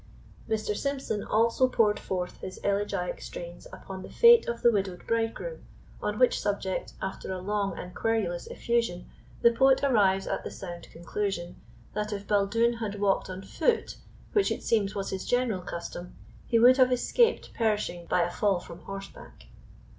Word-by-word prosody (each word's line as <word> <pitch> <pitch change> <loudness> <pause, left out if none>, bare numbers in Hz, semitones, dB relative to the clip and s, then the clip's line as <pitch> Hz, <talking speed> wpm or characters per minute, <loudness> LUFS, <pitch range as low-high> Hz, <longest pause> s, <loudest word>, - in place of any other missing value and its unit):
Mr. 215 -1 -1
Symson 270 -5 -2
also 230 +4 +3
poured 210 -4 +2
forth 180 -1 -4
his 185 - -7
elegiac 200 -3 -1
strains 175 0 -8
upon 190 -1 -8
the - - -9
fate 470 -1 +7
of 235 0 -3
the 235 - +7
widowed 195 -4 -2
bridegroom, 230 - -2 0.4
on 210 0 -2
which 250 +1 +3
subject, 200 -2 -2
after 190 0 -4
a 185 - -2
long 200 +1 -2
and 180 0 -7
querulous 220 -6 -1
effusion, 230 -7 -1 0.4
the 235 - +7
poet 265 +3 +4
arrives 200 -8 +3
at - - -2
the - - -5
sound 175 -3 -8
conclusion, 175 +1 -3 0.4
that 210 0 -2
if 200 -1 -4
Baldoon 220 +4 +2
had 205 -3 -4
walked 200 -2 +1
on 185 +1 -6
foot, 460 - 0 0.4
which 410 -2 +3
it - - -3
seems 210 -3 +1
was 195 -1 -3
his 190 - -3
general 245 -6 0
custom, 175 0 -7 0.3
he 230 - +3
would 250 +3 +7
have 255 -1 +5
escaped 465 - +2
perishing 210 -6 -1
by 180 - +2
a 175 - -2
fall 195 -1 +1
from 170 0 -11
horseback. 195 +1 -10
205 Hz, 165 wpm, -28 LUFS, 190-235 Hz, 0.4 s, fate